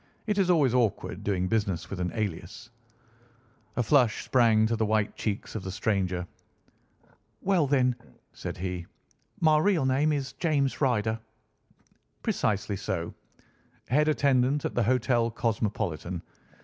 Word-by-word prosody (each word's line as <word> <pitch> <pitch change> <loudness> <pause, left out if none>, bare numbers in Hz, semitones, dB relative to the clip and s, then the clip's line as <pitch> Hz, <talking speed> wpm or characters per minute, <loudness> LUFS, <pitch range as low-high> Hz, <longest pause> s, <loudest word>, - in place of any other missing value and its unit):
"It 210 -2 0
is 185 -2 +2
always 150 -8 +4
awkward 120 -5 0
doing 95 -2 0
business 100 -5 -1
with 100 - -4
an 90 0 -1
alias." 105 +2 -4 1.0
A 125 - +1
flush 125 -2 +3
sprang 115 -4 +4
to 115 +1 +1
the 110 - 0
white 110 -1 +1
cheeks 105 -2 -3
of 110 - -4
the 95 - -6
stranger. 95 -2 -1 1.2
"Well 185 -6 +2
then," 130 -3 +2 0.4
said - - -6
he, 90 -1 -4 0.5
"my 155 -2 +5
real 170 -4 +2
name 135 +4 +2
is 135 -3 -2
James 145 -6 0
Ryder." 115 -4 +1 1.0
"Precisely 105 -1 0
so. 85 -3 -3 0.8
Head 150 +5 +3
attendant 140 -2 +2
at - - -2
the 120 - +1
Hotel 120 0 +2
Cosmopolitan. 100 -7 -2
115 Hz, 135 wpm, -28 LUFS, 100-135 Hz, 1.2 s, my